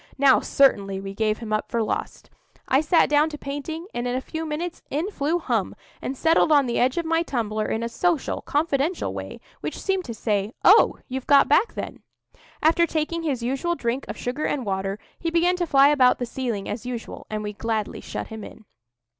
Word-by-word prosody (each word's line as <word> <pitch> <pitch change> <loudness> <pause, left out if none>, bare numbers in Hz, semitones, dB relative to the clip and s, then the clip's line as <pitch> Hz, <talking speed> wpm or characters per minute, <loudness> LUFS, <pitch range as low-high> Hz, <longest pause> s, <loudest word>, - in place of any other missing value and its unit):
Now 275 -1 +6
certainly 200 -8 +2
we 195 0 -6
gave 215 +1 0
him 220 -2 -5
up 215 - -1
for 230 -1 0
lost. - - -4 0.4
I 270 - +4
sat 320 +2 +4
down 295 +1 +3
to 300 - -7
painting, 290 +4 -5
and 240 +1 -2
in 245 - -1
a - - +1
few 320 +4 -5
minutes 330 +3 -4
in 320 +9 -2
flew 310 -1 0
Hum, - - -1 0.3
and 270 - -4
settled 325 +1 +3
on 290 -2 +5
the 240 - -1
edge 255 +4 +2
of 340 - 0
my 330 0 +2
tumbler 220 -8 -2
in 225 - -2
a - - -1
social, 330 +5 0
confidential 295 +2 0
way, - - -7 0.2
which - - -5
seemed 385 -1 0
to 230 - -6
say, 210 0 -1
"Oh, 405 +5 +7
you've 260 -1 -5
got 280 -1 +6
back 380 +10 +3
then." - - -6 0.6
After 330 +2 +4
taking 320 +2 -2
his 275 -7 -2
usual 275 +8 -1
drink 245 -1 -2
of - - -6
sugar 255 +5 -3
and 265 -4 -1
water, 195 0 -2 0.2
he 335 - -1
began 340 +2 +2
to 350 -1 -1
fly 275 -1 +6
about 260 -4 +4
the 245 - -2
ceiling 235 -5 -3
as 215 +2 -4
usual, 245 -2 -6
and 215 0 -3
we 210 0 -4
gladly 220 0 -3
shut - - -6
him 220 -1 -7
in. 220 - -12
270 Hz, 210 wpm, -24 LUFS, 230-320 Hz, 0.6 s, Oh